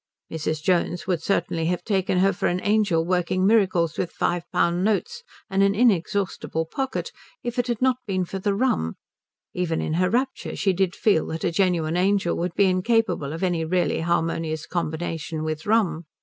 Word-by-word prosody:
Mrs. 155 -1 -3
Jones 175 -1 +1
would 180 -4 -1
certainly 170 -3 0
have 175 0 -1
taken 190 -2 0
her 195 +2 +3
for - - -1
an 180 - 0
angel 205 -6 +2
working 180 +1 +1
miracles 185 -6 +2
with 175 - -1
five 175 -1 -2
pound 175 0 +1
notes 455 - 0 0.3
and 195 -2 +1
an 200 0 +3
inexhaustible 195 -6 +1
pocket 265 +11 -3 0.3
if 240 +1 -3
it 245 - 0
had 240 0 -1
not 260 -1 +3
been 185 -2 0
for 190 +2 -5
the 200 +1 0
rum; 200 - 0 0.6
even 175 -3 -1
in 155 - -2
her 185 - +3
rapture 260 +3 -1
she 195 -2 +1
did 190 0 0
feel 200 -7 +2
that 160 0 -5
a 170 - +1
genuine 170 -3 +1
angel 190 -1 +2
would 175 0 -3
be 200 - +4
incapable 185 -5 +1
of 165 +4 -5
any 175 -3 +1
really 175 +2 0
harmonious 165 -2 -1
combination 165 -1 -3
with 155 +1 -4
rum. 185 -7 +1
180 Hz, 180 wpm, -24 LUFS, 165-200 Hz, 0.6 s, be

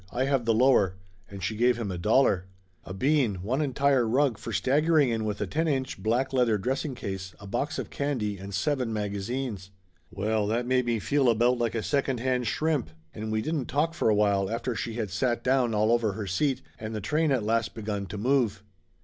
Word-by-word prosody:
I 130 +2 0
have 135 -3 +1
the 115 - +3
lower!" 110 -7 +4 0.3
And 100 -2 -8
she 110 - -1
gave 120 +2 +3
him 110 -5 -3
a 90 - -4
dollar. 100 -2 +3 0.4
A - - -8
bean 130 +1 +1
one 130 +8 0
entire 135 -3 +2
rug 130 0 +2
for - - -6
staggering 150 +1 +3
in 110 -2 -1
with 105 -1 -3
a - - +1
ten 160 +2 -1
inch 130 -8 -2
black 120 +6 0
leather 120 -4 +3
dressing 130 +6 -2
case, 95 -4 -6
a 100 - -11
box 140 +10 -2
of - - -5
candy 115 -9 -2
and 100 +1 -8
seven 125 +5 0
magazines! 105 0 -3 0.4
Well, 105 +1 -1
that 115 +3 0
made 125 0 +1
me 120 -1 +1
feel 135 +4 +2
about 120 +2 +3
like 120 -1 0
a 110 - -1
second 135 -3 0
hand 125 -1 0
shrimp, 155 - 0 0.2
and 110 0 -5
we 110 0 0
didn't 155 -5 -2
talk 155 +4 0
for 165 - +1
a 105 - +4
while 100 -2 +2
after 115 +2 -2
she 115 0 -4
had 110 -5 -3
sat 120 +5 0
down 125 -3 +2
all 110 +2 +3
over 115 -4 +2
her 105 +1 -5
seat, 130 +9 0 0.2
and 110 0 -5
the - - -2
train 150 +9 +1
at 130 -5 +1
last 115 +1 0
begun 105 -3 -4
to 100 +3 -6
move. 115 -3 +1
115 Hz, 215 wpm, -27 LUFS, 105-135 Hz, 0.4 s, lower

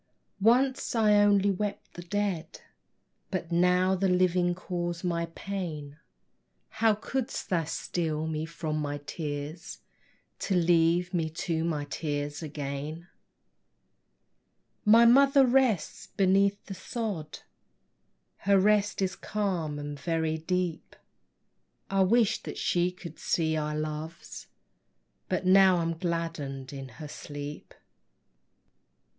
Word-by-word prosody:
Once 250 +5 +2
I 215 -2 +4
only 205 -1 +4
wept 205 +2 -4
the 175 - -8
dead, 190 -2 -3 0.7
But 175 -3 -4
now 180 +2 +3
the 190 +1 +1
living 180 -1 +2
cause 175 -1 -4
my 170 -2 -1
pain: 160 -7 -5 0.7
How 220 -1 +2
couldst 255 +4 -4
thou 170 -3 +1
steal 160 -1 -2
me 160 0 -3
from 160 -2 -3
my 145 -1 -2
tears, 150 +1 -5 0.6
To 195 - -1
leave 175 +1 +3
me 165 -3 0 0.2
to 165 -2 0
my 155 -3 -1
tears 145 0 -3
again? 150 +2 -5 1.8
My 225 +3 +7
Mother 275 +3 +6
rests 250 -7 +1
beneath 195 0 +2
the 195 - -6
sod, 190 -6 -5 1.0
Her 200 0 +3
rest 205 0 +2
is 190 0 -1
calm 180 -8 -2
and 145 0 -6
very 160 0 -1
deep: 180 0 -2 1.0
I 195 0 +3
wish'd 220 +3 +3
that - - -6
she 175 0 +1
could 170 -3 -11
see 160 -2 0
our 150 -1 -2
loves, 155 +2 -6 0.8
But 185 0 -1
now 190 0 +6
I 165 -1 0
gladden 165 -6 -3
in 135 -2 -7
her 155 - -7
sleep. 145 0 -8
175 Hz, 115 wpm, -28 LUFS, 155-195 Hz, 1.8 s, My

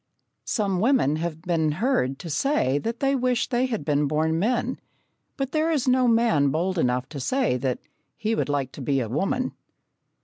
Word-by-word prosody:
Some 195 -5 0
women 210 - +3
have 160 -1 -4
been 160 -4 +1
heard 155 - 0
to 170 - -7
say 145 - +1
that 230 +7 -4
they 275 0 +2
wish 250 -2 0
they 250 +1 +1
had 225 - -3
been 145 -1 +2
born 160 +2 +1
men, 240 +5 0 0.6
but 270 -2 -2
there 315 +1 +1
is 295 -6 0
no 255 0 +4
man 225 -12 +3
bold 175 +5 -1
enough 125 -2 0
to 150 - -6
say 255 - +1
that 130 0 -1 0.4
he 220 -1 -1
would 220 - -1
like 140 -2 -1
to - - -9
be 135 +1 +1
a 120 - -2
woman. 195 - -1
180 Hz, 190 wpm, -25 LUFS, -, 0.6 s, no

